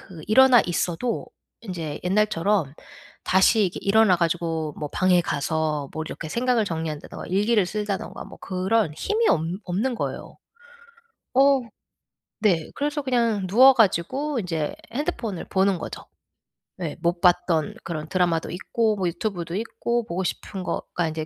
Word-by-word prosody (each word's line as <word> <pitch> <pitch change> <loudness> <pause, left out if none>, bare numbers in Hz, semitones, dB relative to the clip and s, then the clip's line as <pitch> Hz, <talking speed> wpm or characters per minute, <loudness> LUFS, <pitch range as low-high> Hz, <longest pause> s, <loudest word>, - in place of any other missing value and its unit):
그 170 -4 -12
일어나 260 +1 +7
있어도 175 +7 -2 0.3
인제 170 -8 -5
옛날처럼 195 -4 +1 0.5
다시 190 +4 +4
이렇게 180 - -3
일어나 200 -1 +5
가지고 165 -2 -1
뭐 150 - -4
방에 185 -1 +3
가서 150 -2 -1
뭐 160 - -4
이렇게 155 - -6
생각을 240 +2 +1
정리한다든가 160 -5 -5
일기를 205 +2 +2
쓴다든가 205 0 -4
뭐 - - -13
그럴 190 -1 0
힘이 440 - +1
없 160 - +3 0.2
없는 215 +8 -1
거예요. - - -5 1.0
어 275 +1 +5 0.8
네. 180 -7 +1
그래서 295 +1 -2
그냥 235 -7 +1
누워 255 +8 +7
가지고 250 - +1
이제 165 -6 -3 0.2
핸드폰을 235 - -3
보는 190 -1 +2
거죠. - - -7 0.8
예. 155 - -3
못 170 +1 0
봤던 175 -3 +2
그런 155 -2 -5
드라마도 175 -3 0
있고 215 +4 0
뭐 185 -2 0
유튜브도 175 -1 -3
있고 235 +2 -2
보고 185 -1 -3
싶은 190 +1 -4
거가 170 -1 -2
이제 155 0 -4
185 Hz, 310 characters per minute, -24 LUFS, 165-225 Hz, 1.0 s, 일어나